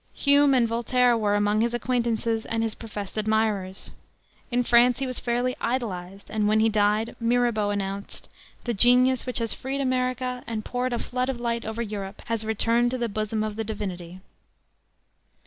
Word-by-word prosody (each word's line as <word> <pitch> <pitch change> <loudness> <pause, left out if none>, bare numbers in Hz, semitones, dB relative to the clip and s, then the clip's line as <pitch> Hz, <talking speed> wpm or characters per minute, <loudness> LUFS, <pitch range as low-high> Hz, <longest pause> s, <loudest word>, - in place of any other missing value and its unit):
Hume 285 -1 +5
and 240 -2 +3
Voltaire 240 +1 +2
were 210 -2 +1
among 205 +1 +2
his 235 +1 0
acquaintances 235 -2 -1
and 225 0 -1
his 225 -1 -1
professed 210 -2 -6
admirers. 215 -3 -1 0.6
In 245 -1 +1
France 240 +1 +5
he 270 - -2
was 255 -1 -4
fairly 245 +1 -1
idolized, 195 -6 -3
and 215 -1 +1
when 215 +1 +3
he 225 +1 +4
died 210 +1 +1
Mirabeau 235 -3 +1
announced, 200 0 -4 0.4
"The 240 - -1
genius 250 +4 +4
which 250 - 0
has 230 -2 0
freed 270 +2 -4
America 255 -1 -1
and 220 -2 -4
poured 250 0 -2
a - - 0
flood 250 +2 -2
of 255 -3 -3
light 235 -1 -2
over 220 +2 -3
Europe 200 -2 -6
has 230 -2 -2
returned 230 +2 +1
to 255 - -2
the 240 -2 -1
bosom 215 +1 -2
of 215 -1 -4
the 225 - -1
Divinity." 185 -4 -6
230 Hz, 175 wpm, -25 LUFS, 210-245 Hz, 0.6 s, Hume